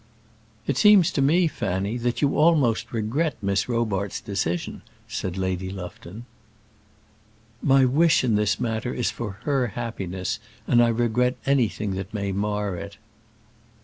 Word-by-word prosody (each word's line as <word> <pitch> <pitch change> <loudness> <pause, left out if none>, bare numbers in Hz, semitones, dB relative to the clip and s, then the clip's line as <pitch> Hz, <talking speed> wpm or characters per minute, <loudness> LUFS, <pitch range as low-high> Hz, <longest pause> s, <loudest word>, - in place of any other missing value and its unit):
"It 140 - -1
seems 190 +1 +6
to 140 - 0
me, 165 +6 +4
Fanny, 100 - -2
that 120 +3 -1
you 140 - +2
almost 150 -8 +3
regret 120 +8 -1
Miss 100 +1 0
Robarts' 105 -5 -1
decision," 90 -4 -3 0.3
said 95 0 -4
Lady 95 0 -2
Lufton. 95 +3 -8 1.4
"My 135 -1 +5
wish 155 +5 +3
in 120 -3 +2
this 105 0 +1
matter 115 +1 -2
is 125 - 0
for 105 -4 -5
her 135 -4 +1
happiness, 95 -6 -3 0.3
and 120 - +5
I 120 - +5
regret 120 +2 +1
anything 115 -6 +1
that 95 +3 -6
may 100 -1 -2
mar 105 0 -1
it." 100 +3 -8
115 Hz, 140 wpm, -24 LUFS, 100-130 Hz, 1.4 s, seems